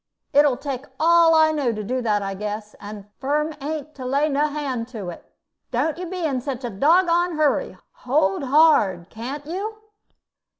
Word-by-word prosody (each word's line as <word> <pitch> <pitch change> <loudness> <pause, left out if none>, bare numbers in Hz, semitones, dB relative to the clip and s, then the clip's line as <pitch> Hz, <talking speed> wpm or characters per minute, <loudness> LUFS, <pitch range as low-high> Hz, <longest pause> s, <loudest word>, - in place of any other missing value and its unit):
It 290 +1 +6
'll 265 - +1
take 275 -1 -5
all 330 0 +5
I 315 0 +5
know 285 -6 0
to 215 -1 -5
do 255 +5 -2
that, 210 -3 0
I 195 0 -3
guess; 210 +1 -5
and 205 -1 -9
Firm 300 +3 0
ain't 305 +1 -5
to 265 - -9
lay 280 +4 +1
no 290 +1 +1
hand 275 -6 -3
to 215 -7 -7
it. - - -14 0.4
Don't 290 +6 -1
you 360 - -5
be 360 -1 -3
in 265 -5 -1
such 260 -1 -5
a 240 - -3
doggoned 340 - +3
hurry. 300 -2 +1 0.2
Hold 245 -7 +1
hard, 255 - +3
can't 265 +6 -6
you?" 395 +7 -4
280 Hz, 180 wpm, -22 LUFS, 230-310 Hz, 0.4 s, It